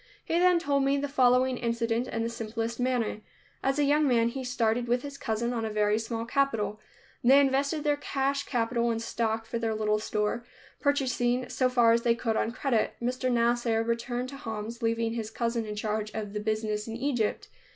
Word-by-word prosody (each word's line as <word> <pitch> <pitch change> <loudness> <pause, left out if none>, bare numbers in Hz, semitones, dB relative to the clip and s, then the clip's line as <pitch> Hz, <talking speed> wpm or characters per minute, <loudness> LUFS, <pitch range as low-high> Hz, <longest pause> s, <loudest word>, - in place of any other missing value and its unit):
He 335 - +1
then 360 0 +5
told 285 -5 +1
me 275 +1 +2
the 285 +1 -1
following 255 -2 +3
incident 235 0 0
in 225 - -2
the 230 - -1
simplest 230 0 -4
manner. 245 -4 0 0.4
As 270 +1 0
a 295 - +3
young 295 +1 +3
man 235 -2 +3
he 260 +2 -5
started 240 -1 0
with 245 +1 +1
his 285 -1 -7
cousin 235 -1 -2
on 230 -2 -2
a 220 - -1
very 210 0 +2
small 225 0 -3
capital. 230 -5 0 0.4
They 265 +3 +7
invested 280 +2 +1
their 295 -1 +2
cash 275 -1 -1
capital 235 -1 0
in 230 - 0
stock 225 0 -2
for 230 +1 -3
their 225 -1 -1
little 215 0 +1
store, 210 +2 -1 0.4
purchasing 255 -3 +1
so 255 -1 +1
far 240 -2 +4
as 230 0 +3
they 235 -1 +3
could 230 -1 -1
on 225 - 0
credit. 245 -2 0
Mr. 255 +1 -1
Nasser 235 -1 +2
returned 240 +2 -2
to 275 - -8
Homs, 225 -2 -6
leaving 230 0 0
his 225 -2 -3
cousin 230 0 -2
in 210 - -4
charge 215 0 -2
of 210 -2 -4
the 210 - -2
business 215 0 -2
in 225 - -5
Egypt. 245 -4 -1
235 Hz, 200 wpm, -28 LUFS, 225-260 Hz, 0.4 s, They